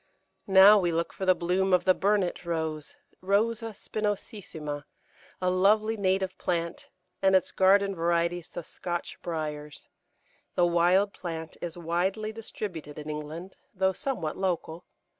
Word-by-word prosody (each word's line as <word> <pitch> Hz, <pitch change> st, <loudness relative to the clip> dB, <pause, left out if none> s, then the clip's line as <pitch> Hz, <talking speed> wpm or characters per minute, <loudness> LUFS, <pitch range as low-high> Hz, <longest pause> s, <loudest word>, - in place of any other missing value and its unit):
Now 195 Hz, +2 st, +8 dB
we 175 Hz, -3 st, +1 dB
look 165 Hz, 0 st, -1 dB
for 190 Hz, -, -5 dB
the 185 Hz, -, +6 dB
bloom 185 Hz, +2 st, +1 dB
of 180 Hz, -1 st, +3 dB
the 185 Hz, -, +6 dB
Burnet 195 Hz, -2 st, 0 dB
Rose 160 Hz, -3 st, -3 dB, 0.3 s
(Rosa 225 Hz, +4 st, +1 dB
spinosissima), 195 Hz, -10 st, -4 dB, 0.5 s
a 185 Hz, -, +1 dB
lovely 210 Hz, +4 st, +3 dB
native 190 Hz, -2 st, 0 dB
plant, 170 Hz, -2 st, -2 dB, 0.3 s
and 190 Hz, 0 st, +4 dB
its 185 Hz, -, +2 dB
garden 195 Hz, +1 st, +4 dB
varieties, 170 Hz, 0 st, 0 dB
the 175 Hz, -, -7 dB
Scotch 175 Hz, +2 st, -5 dB
Briars. 150 Hz, -3 st, -5 dB, 0.7 s
The 175 Hz, -, +4 dB
wild 175 Hz, +4 st, +3 dB
plant 165 Hz, -3 st, -6 dB
is 175 Hz, -1 st, -5 dB
widely 185 Hz, +6 st, -1 dB
distributed 185 Hz, -9 st, -7 dB
in 150 Hz, 0 st, -5 dB
England, 155 Hz, +5 st, -7 dB, 0.2 s
though 190 Hz, 0 st, +2 dB
somewhat 185 Hz, -, -3 dB
local. 175 Hz, -2 st, -2 dB
180 Hz, 135 wpm, -28 LUFS, 165-195 Hz, 0.7 s, Now